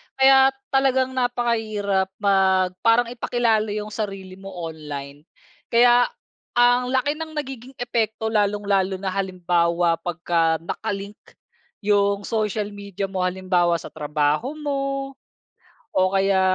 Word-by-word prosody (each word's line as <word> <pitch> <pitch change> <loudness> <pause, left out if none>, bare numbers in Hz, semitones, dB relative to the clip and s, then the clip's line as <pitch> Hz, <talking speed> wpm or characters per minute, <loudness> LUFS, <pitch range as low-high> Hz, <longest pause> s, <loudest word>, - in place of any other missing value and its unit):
Kaya 265 0 +6 0.2
talagang 265 -1 +2
napakahirap 225 -6 0 0.2
mag 190 -2 +3
parang 235 +1 +3
ipakilala 230 -2 +1
yung 210 0 -4
sarili 195 -3 -5
mo 195 -1 -9
online. 145 -2 -7 0.4
Kaya 240 +1 +5 0.5
ang 245 +1 +4
laki 260 +2 +1
ng 320 0 -6
nagiging 265 -3 -6
epekto 220 -2 -1
lalong-lalo 200 -2 +1
na 190 0 -3
halimbawa, 175 -3 +1
pagka 170 -1 0
naka-link 200 +2 -5 0.6
yung 200 0 +2
social 215 -1 -2
media 200 -1 -5
mo 190 - -3
halimbawa, 180 -2 +1
sa 165 - -6
trabaho 150 - 0
mo 290 -2 -2 1.1
o 185 0 +3
kaya, 195 0 +3
200 Hz, 110 wpm, -23 LUFS, 185-240 Hz, 1.1 s, Kaya